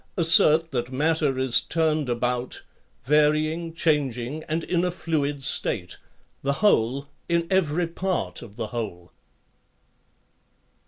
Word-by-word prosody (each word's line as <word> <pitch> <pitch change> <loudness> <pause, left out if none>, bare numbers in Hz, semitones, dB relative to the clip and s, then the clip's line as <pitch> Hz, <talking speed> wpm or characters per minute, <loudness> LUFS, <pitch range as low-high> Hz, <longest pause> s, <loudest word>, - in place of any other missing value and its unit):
assert 165 -1 +5
that 125 -1 -3
matter 150 0 +1
is 130 -2 +3
turned 155 -4 0
about, 125 +1 -2 0.4
varying, 155 +3 +2
changing, 150 -4 -1
and 160 +1 -1
in 175 -1 0
a 180 - +1
fluid 145 -5 -2
state, 95 -9 -1 0.4
the 140 +1 0
whole 140 - +2 0.2
in 170 0 +1
every 175 -2 +2
part 180 +2 -3
of 105 -4 -12
the 115 - -3
whole. 100 -7 -5
150 Hz, 115 wpm, -25 LUFS, 125-165 Hz, 0.4 s, assert